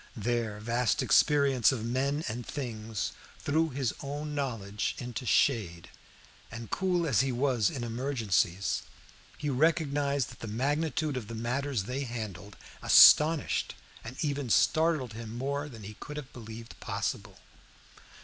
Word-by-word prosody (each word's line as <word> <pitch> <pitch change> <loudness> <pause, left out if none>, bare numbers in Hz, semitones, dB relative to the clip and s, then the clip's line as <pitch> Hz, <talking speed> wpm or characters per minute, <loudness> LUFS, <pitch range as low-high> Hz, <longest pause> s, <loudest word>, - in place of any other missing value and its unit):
Their 115 -1 -1
vast 115 +1 0
experience 140 -5 +4
of 115 -4 -3
men 135 +5 0
and 120 +3 -4
things 115 -6 -4 0.3
threw 160 +3 +1
his 130 -4 -2
own 145 +2 -5
knowledge 115 -8 -2
into 125 +1 -5
the - - -1
shade, 95 -11 +1 0.6
and 115 0 -8
cool 180 -3 +1
as 135 -9 +2
he 135 0 0
was 125 -4 +1
in 125 - -5
emergencies, 115 -7 0 0.6
he 145 - -2
recognized 145 -2 +1
that - - -14
the 115 - -6
magnitude 145 +5 -1
of 115 -5 -5
the 115 - -6
matters 125 0 -1
they 125 +7 -3
handled 105 -5 -7 0.2
astonished 155 0 +6 0.3
and 125 +4 -8
even 145 -4 -2
startled 155 -2 +2
him 115 +1 -7
more 140 +3 -2
than 115 -5 -11
he 105 +2 -8
could 150 0 -7
have 140 -3 -8
believed 115 -1 -10
possible. - - -4
125 Hz, 140 wpm, -30 LUFS, 115-145 Hz, 0.6 s, astonished